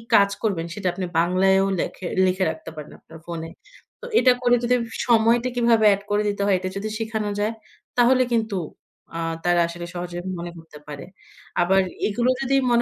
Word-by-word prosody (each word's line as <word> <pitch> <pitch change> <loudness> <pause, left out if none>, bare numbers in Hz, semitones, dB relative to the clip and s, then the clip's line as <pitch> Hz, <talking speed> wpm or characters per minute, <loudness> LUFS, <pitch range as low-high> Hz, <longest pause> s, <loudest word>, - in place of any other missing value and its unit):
কাজ 200 0 +6
করবেন 180 -6 0
সেটা 195 -2 -3
আপনি 185 0 -4
বাংলায়ও 190 +3 +3
লেখে 185 - -4 0.2
লিখে 185 +1 +1
রাখতে 160 - -9
পারেন 150 -1 -9
আপনার 160 - -14
ফোনে। 165 -1 -6 0.5
তো - - -8
এটা 255 - +6
করে 245 -1 +4
যদি 245 +1 +3 0.3
সময়টা 235 +1 +3
কিভাবে 235 -2 +3
এড 200 - -3
করে 210 +1 +2
দিতে 200 0 -3
হয় 200 - +3
এটা 185 - -4
যদি 210 +2 -3
শিখানো 220 -2 -2
যায় 215 +2 0 0.4
তাহলে 255 +1 +5
কিন্তু 220 -3 0 0.6
আ - - -3 0.3
তারা 175 0 +3
আসলে 175 0 -7
সহজে 175 0 -5 0.2
মনে 175 0 -5
করতে 160 -2 -13
পারে। 145 -2 -7 0.6
আবার 190 +2 +4 0.3
এগুলো 240 +4 0
যদি 270 0 +1 0.2
মনে 235 0 +4
200 Hz, 180 wpm, -23 LUFS, 175-230 Hz, 0.6 s, কাজ